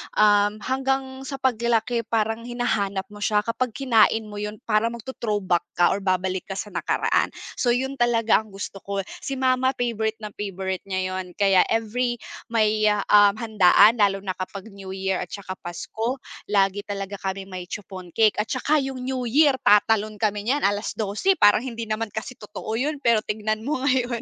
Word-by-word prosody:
um, 205 Hz, 0 st, +4 dB
hanggang 265 Hz, +2 st, -2 dB
sa 275 Hz, 0 st, -6 dB
paglaki 235 Hz, -2 st, +1 dB
parang 225 Hz, 0 st, -1 dB
hinahanap 215 Hz, -5 st, -1 dB
mo 205 Hz, 0 st, -7 dB
siya. 210 Hz, -1 st, +2 dB
Kapag 235 Hz, +2 st, -1 dB
kinain 225 Hz, -3 st, +3 dB
mo 210 Hz, -, -9 dB
'yun 210 Hz, 0 st, -5 dB
parang 225 Hz, +1 st, +2 dB
magto-throwback 210 Hz, -7 st, -1 dB
ka 175 Hz, -, +4 dB
or 200 Hz, -, -6 dB
babalik 185 Hz, 0 st, 0 dB
ka -, -, -3 dB
sa -, -, -4 dB
nakaraan. -, -, 0 dB, 0.2 s
So 245 Hz, -, +1 dB
'yun 265 Hz, +3 st, -1 dB
talaga 230 Hz, -3 st, +3 dB
ang 215 Hz, -, -17 dB
gusto 195 Hz, 0 st, -7 dB
ko 200 Hz, 0 st, -3 dB
eh. -, -, -24 dB, 0.2 s
Si 275 Hz, -, -3 dB
mama 260 Hz, 0 st, +2 dB
favorite 225 Hz, -3 st, -2 dB
na 210 Hz, -2 st, -8 dB
favorite 190 Hz, -2 st, -4 dB
niya 185 Hz, -1 st, -2 dB
'yun 185 Hz, -1 st, -5 dB
kaya 195 Hz, -2 st, +4 dB
every 240 Hz, +2 st, 0 dB, 0.3 s
may, 215 Hz, -1 st, +2 dB, 0.2 s
um, 205 Hz, -1 st, +7 dB
handaan 215 Hz, 0 st, +5 dB
lalo 200 Hz, -2 st, +3 dB
na 190 Hz, -2 st, -4 dB
kapag 195 Hz, +1 st, -9 dB
New 195 Hz, -1 st, -10 dB
Year 190 Hz, 0 st, -2 dB
at 180 Hz, -, -6 dB
saka 195 Hz, -2 st, -6 dB
Pasko 220 Hz, +8 st, -4 dB, 0.3 s
lagi 200 Hz, 0 st, +2 dB
talaga 200 Hz, -1 st, -5 dB
kami 190 Hz, 0 st, -3 dB
may 185 Hz, -2 st, -8 dB
chiffon 190 Hz, -3 st, -8 dB
cake 215 Hz, +4 st, +3 dB
at 220 Hz, -, -6 dB
saka 290 Hz, +3 st, +1 dB
'yung 270 Hz, -1 st, -4 dB
New 255 Hz, -2 st, -2 dB
Year, 285 Hz, +3 st, +5 dB
tatalon 215 Hz, -1 st, +3 dB
kami 210 Hz, -1 st, 0 dB
niyan 290 Hz, +2 st, +1 dB
12:00 210 Hz, -, 0 dB
parang 205 Hz, -2 st, +5 dB
hindi 230 Hz, -3 st, -5 dB
naman 220 Hz, +1 st, -2 dB
kasi 220 Hz, +4 st, -6 dB
totoo 210 Hz, 0 st, -7 dB
'yun. 290 Hz, +6 st, -1 dB
Pero 235 Hz, -5 st, +3 dB
tignan 215 Hz, +1 st, -2 dB
mo 285 Hz, +6 st, -1 dB
ngayon, 250 Hz, -4 st, +1 dB
215 Hz, 180 wpm, -24 LUFS, 200-240 Hz, 0.3 s, um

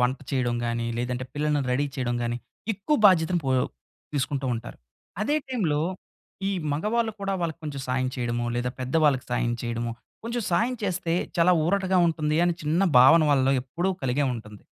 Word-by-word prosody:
వంట 125 Hz, +2 st, +1 dB
చేయడం 125 Hz, -3 st, 0 dB
గాని 115 Hz, 0 st, -1 dB
లేదంటే 125 Hz, +1 st, -2 dB
పిల్లల్ని 150 Hz, 0 st, +1 dB
రెడీ 145 Hz, +3 st, +1 dB
చేయడం 120 Hz, -2 st, -1 dB
గాని 120 Hz, 0 st, -1 dB, 0.4 s
ఎక్కువ 250 Hz, +10 st, 0 dB
బాధ్యతను 175 Hz, -2 st, +3 dB
పో 135 Hz, -, 0 dB, 0.6 s
తీసుకుంటూ 135 Hz, -1 st, -1 dB
ఉంటారు. 115 Hz, -, -7 dB, 0.4 s
అదే 295 Hz, +7 st, +1 dB
టైమ్‌లో 175 Hz, -, 0 dB, 0.7 s
ఈ -, -, 0 dB, 0.2 s
మగవాళ్ళు 220 Hz, +8 st, 0 dB
కూడా 195 Hz, 0 st, -1 dB
వాళ్ళకి 165 Hz, -2 st, -2 dB
కొంచెం 145 Hz, -3 st, -5 dB
సాయం 130 Hz, 0 st, 0 dB
చేయడమో, 120 Hz, -1 st, -1 dB
లేదా 125 Hz, +1 st, -1 dB
పెద్దవాళ్ళకి 135 Hz, 0 st, +2 dB
సాయం 120 Hz, -1 st, 0 dB
చేయడమో 120 Hz, 0 st, -2 dB, 0.3 s
కొంచెం 235 Hz, +1 st, -2 dB
సాయం 230 Hz, +8 st, +2 dB
చేస్తే 180 Hz, -3 st, -1 dB, 0.2 s
చాలా 170 Hz, +2 st, +5 dB
ఊరటగా 190 Hz, +1 st, +2 dB
ఉంటుందని 165 Hz, +1 st, +1 dB
చిన్న 160 Hz, +5 st, +1 dB, 0.2 s
భావన 155 Hz, +6 st, +8 dB
వాళ్ళలో 135 Hz, -1 st, +3 dB
ఎప్పుడూ 170 Hz, +8 st, -2 dB
కలిగే 135 Hz, +3 st, +1 dB
ఉంటుంది. 105 Hz, -2 st, -10 dB
145 Hz, 155 wpm, -26 LUFS, 125-175 Hz, 0.7 s, భావన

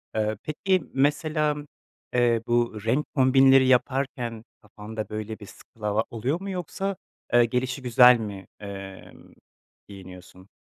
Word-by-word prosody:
Eee, 110 Hz, -1 st, 0 dB
peki, 185 Hz, +2 st, 0 dB
mesela, 150 Hz, +1 st, 0 dB, 0.5 s
eee, 120 Hz, -2 st, +2 dB
bu 120 Hz, -3 st, 0 dB
renk 130 Hz, +6 st, +1 dB
kombinleri 135 Hz, 0 st, +5 dB
yaparken 125 Hz, -3 st, 0 dB, 0.2 s
kafanda, 105 Hz, +1 st, -8 dB
böyle, 110 Hz, +1 st, -5 dB
bir 105 Hz, -, -10 dB
skala 105 Hz, +1 st, -4 dB
oluyor 130 Hz, +9 st, -2 dB
mu? 200 Hz, -, -5 dB
Yoksa, 190 Hz, +2 st, -4 dB, 0.4 s
eee, 120 Hz, -1 st, +6 dB
gelişigüzel 125 Hz, 0 st, +4 dB
mi, 100 Hz, -3 st, -7 dB
emm, 100 Hz, -2 st, -10 dB, 0.5 s
giyiniyorsun? 95 Hz, -1 st, -13 dB
120 Hz, 115 wpm, -25 LUFS, 105-140 Hz, 0.5 s, eee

